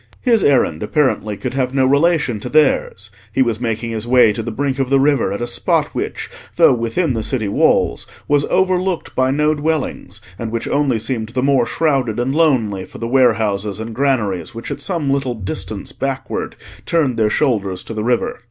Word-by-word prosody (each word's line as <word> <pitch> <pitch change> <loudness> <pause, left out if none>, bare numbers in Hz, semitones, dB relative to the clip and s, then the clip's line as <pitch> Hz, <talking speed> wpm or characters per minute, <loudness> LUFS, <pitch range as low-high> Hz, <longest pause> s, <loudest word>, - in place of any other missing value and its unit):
His 230 -5 +3
errand, 105 - +2
apparently, 110 -4 0
could 125 +3 -4
have 130 -1 -1
no 135 -1 +3
relation 140 -4 +2
to 125 - -6
theirs; 130 -9 +1 0.2
he 130 - +3
was 115 -2 -2
making 115 -1 -2
his 110 0 -4
way 125 -3 +5
to 115 - -4
the 115 - -5
brink 135 +3 -2
of 135 -2 0
the 135 0 +4
river 135 -7 +2
at 100 +4 -3
a - - 0
spot 120 - 0
which, - - -4 0.3
though - - +6
within 125 +6 -1
the 115 - -2
city 110 -1 -2
walls, 100 - +1 0.2
was 145 -1 +3
overlooked 185 -1 0
by 130 0 +1
no 150 +3 +2
dwellings, 150 - -3 0.2
and 115 - -3
which 115 0 -3
only 140 -4 +1
seemed 110 -1 -3
the 125 +1 -2
more 135 -4 +3
shrouded 135 -7 0
and 125 +2 0
lonely 125 - +1
for - - -12
the 115 - -4
warehouses 110 -5 +1
and 110 +1 -6
granaries 110 - -1
which 115 - -6
at - - -5
some 165 -7 -1
little 135 -3 -1
distance 100 -1 -5
backward 135 -1 -4 0.3
turned 150 -7 +1
their 110 -1 +2
shoulders 100 -8 0
to - - -7
the 110 -1 -3
river. 120 +1 0
125 Hz, 195 wpm, -18 LUFS, 110-140 Hz, 0.3 s, though